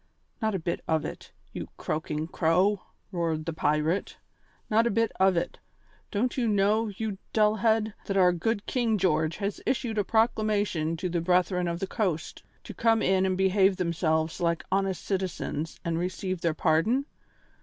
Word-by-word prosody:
"Not 220 -2 +1
a - - -1
bit 170 +1 -3
of 160 -1 +1
it, - - -8 0.2
you - - -5
croaking 155 -1 -3
crow!" 180 +5 +2 0.3
roared 165 -4 -1
the 165 - -2
pirate. 155 +4 0 0.5
"Not 225 +2 +3
a - - +2
bit 230 +1 +1
of 190 -1 +4
it. 170 - -2 0.5
Don't 235 +4 0
you 245 -3 +1
know, 210 +2 +2
you 210 -1 -4
dull 215 0 +3
head, 220 0 +2
that 195 - 0
our 180 -2 +5
good 205 +4 -1
King 235 -4 +1
George 160 -4 +1
has 200 -1 -3
issued 235 -4 -1
a - - +2
proclamation 210 -7 +1
to 185 +3 -2
the 170 -1 -1
Brethren 180 +1 +2
of 170 0 -2
the 195 - -1
Coast 185 -6 -2 0.2
to - - -8
come 225 -1 +2
in 190 0 +3
and 185 -1 0
behave 190 0 +3
themselves 160 -2 0
like 170 -1 +1
honest 195 -1 0
citizens 180 -5 -3
and 165 0 0
receive 185 0 -3
their 165 -2 0
pardon? 180 - +2
190 Hz, 170 wpm, -28 LUFS, 170-215 Hz, 0.5 s, our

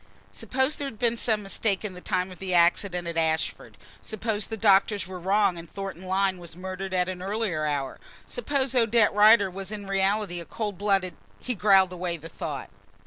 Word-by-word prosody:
Suppose 265 +3 -1
there 285 - -3
had 225 - -8
been 235 0 +1
some 220 -2 0
mistake 195 +1 -1
in 200 - -4
the 180 - -10
time 185 +1 -1
of 180 - -12
the 185 -2 -1
accident 175 +1 +2
at 170 -1 -4
Ashford? 160 -1 -1 0.2
Suppose 215 -1 -2
the 225 - -5
doctors 205 -1 +3
were 185 0 -8
wrong 190 -1 +2
and 165 -1 -12
Thornton 195 -3 -6
Lyne 190 0 +1
was 170 -1 -10
murdered 190 +1 -5
at 180 -1 +1
an 185 -1 -5
earlier 190 -6 -1
hour? 140 -3 -2 0.3
Suppose 280 - -1
Odette 230 -3 +3
Rider 210 -1 +6
was 195 +1 -6
in 205 -1 -5
reality 195 -1 0
a 170 - -8
cold 205 -2 -4
blooded. 195 -4 +1 0.2
He 250 - -3
growled 195 -3 +4
away 175 -1 -3
the 165 +1 -11
thought. 145 -4 -6
195 Hz, 195 wpm, -26 LUFS, 180-215 Hz, 0.3 s, Rider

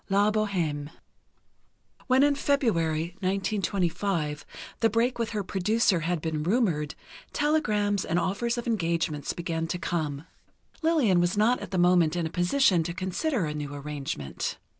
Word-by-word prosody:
V 195 - +1
"LA 205 +1 +4
BOHÊME" 175 -9 -1 1.2
When 260 +1 +5
in 290 0 +4
February 175 - 0
(1925) 190 -5 -1 0.3
the 225 - +3
break 235 +3 +1
with 230 -1 0
her 210 -2 -2
producer 195 +1 +1
had 165 0 -1
been 155 -2 -2
rumored, 170 - 0 0.4
telegrams 210 - +1
with 165 - +1
offers 235 +7 0
of 240 - -3
engagements 165 - -1
began 165 -1 -3
to 170 - -2
come. 155 -4 -3 0.6
Lillian 285 - +3
was 175 +3 0
not 230 +4 +3
at - - -7
the 190 - -2
moment 175 -2 +4
in 170 -2 -1
a 160 - -4
position 180 +1 +3
to 170 +1 -4
consider 190 - -1
a 150 - -3
new 145 -1 -5
arrangement. 140 - -4
180 Hz, 150 wpm, -27 LUFS, 165-220 Hz, 1.2 s, When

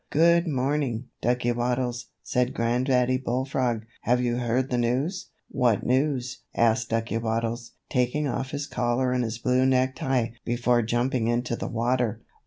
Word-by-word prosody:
"Good 170 +3 +4
morning, 135 -4 -1
Ducky 120 0 +1
Waddles," 120 0 -1 0.2
said 125 +1 0
Granddaddy 125 +2 +2
Bullfrog. 125 -2 -1 0.2
"Have 125 +2 +2
you 120 -1 0
heard 125 +2 0
the 125 - +1
news?" 135 +10 -1 0.2
"What 120 -5 +1
news?" 130 -1 0 0.2
asked 115 0 +2
Ducky 115 0 -1
Waddles, 115 +1 -2
taking 125 +4 0
off 130 +1 -2
his 145 0 -3
collar 125 -1 0
and 125 -1 +1
his 110 -1 -3
blue 125 +2 +2
necktie 130 -2 +1
before 120 0 +2
jumping 120 +1 0
into 120 0 0
the - - -4
water. 120 0 0
125 Hz, 145 wpm, -26 LUFS, 120-130 Hz, 0.2 s, Good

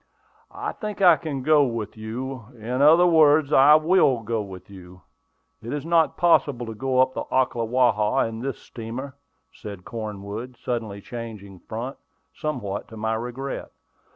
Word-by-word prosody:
"I - - -4
think 210 -2 -6
I 180 -4 +7
can 145 -5 -5
go 150 0 +5
with 115 -5 -3
you; 115 +3 -6
in 120 +4 -3
other 160 +5 +7
words, 155 -3 +5
I 140 +3 +8
will 155 -6 +3
go 115 0 -2
with 95 -3 -10
you. 90 -2 -14 0.6
It 115 +2 -7
is 145 0 -4
not 165 -1 +2
possible 145 -8 +3
to 115 - -6
go 130 +4 -1
up 130 0 +4
the - - -4
Ocklawaha 120 -2 +2
in 110 0 -6
this 135 +3 -4
steamer," 125 +4 -8 0.4
said 100 - -9
Cornwood, 110 +2 -6
suddenly 110 -5 -4
changing 105 -5 -8
front, 120 +7 -6 0.4
somewhat 105 -10 -4
to 110 - -11
my 110 +1 -1
regret. 125 +4 -5
120 Hz, 155 wpm, -24 LUFS, 110-140 Hz, 0.6 s, I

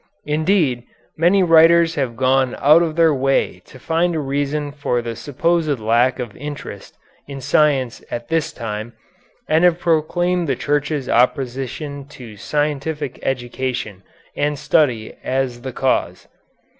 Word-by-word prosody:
Indeed, 155 -4 +1 0.3
many 180 +4 +3
writers 165 0 +5
have 135 -7 -2
gone 130 0 +2
out 155 +4 +5
of 160 -2 -1
their 165 -2 +4
way 135 0 0
to - - -14
find 165 +5 0
a - - 0
reason 145 +1 -2
for 140 -4 -1
the 115 -1 -5
supposed 155 +1 0
lack 120 +3 +2
of 120 -5 -6
interest 145 +1 -8 0.3
in 140 -1 -7
science 135 -3 +1
at 120 0 -5
this 165 -1 0
time, 110 0 -6 0.5
and 160 +2 +2
have 175 -2 +4
proclaimed 175 +1 0
the 135 - +1
Church's 145 0 -1
opposition 135 +3 -1
to 125 -6 -12
scientific 145 +3 -2
education 120 -5 -3 0.3
and 145 0 -1
study 145 -7 +1
as 130 -2 -2
the 130 +1 -5
cause. 130 +1 -1
145 Hz, 135 wpm, -20 LUFS, 125-160 Hz, 0.5 s, writers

